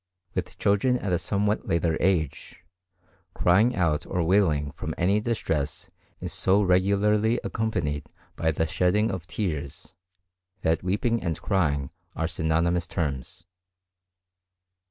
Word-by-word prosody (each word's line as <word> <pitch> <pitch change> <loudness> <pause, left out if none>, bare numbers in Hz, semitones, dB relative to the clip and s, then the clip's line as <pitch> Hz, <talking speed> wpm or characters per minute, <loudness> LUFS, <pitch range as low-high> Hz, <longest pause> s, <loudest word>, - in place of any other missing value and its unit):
With - - -4
children 115 +6 +2
at 100 -6 -3
a 90 - +2
somewhat 100 +4 0
later 85 -1 +1
age, 85 -6 -1 0.7
crying 105 +8 +3
out 80 -5 +1
or 90 -2 0
wailing 80 -6 +2
from - - -5
any 100 +4 +2
distress 80 -10 -2 0.3
is - - -4
so 95 +2 +3
regularly 100 +5 +3
accompanied 75 -10 -2 0.3
by 80 - 0
the 80 +1 0
shedding 90 +7 +1
of 90 -3 -5
tears, 80 -3 -4 0.7
that 80 +1 +2
weeping 105 +5 0
and 85 -3 -2
crying 75 -9 0 0.2
are 80 - -1
synonymous 85 +2 0
terms. 70 0 -3
90 Hz, 120 wpm, -26 LUFS, 80-100 Hz, 0.7 s, crying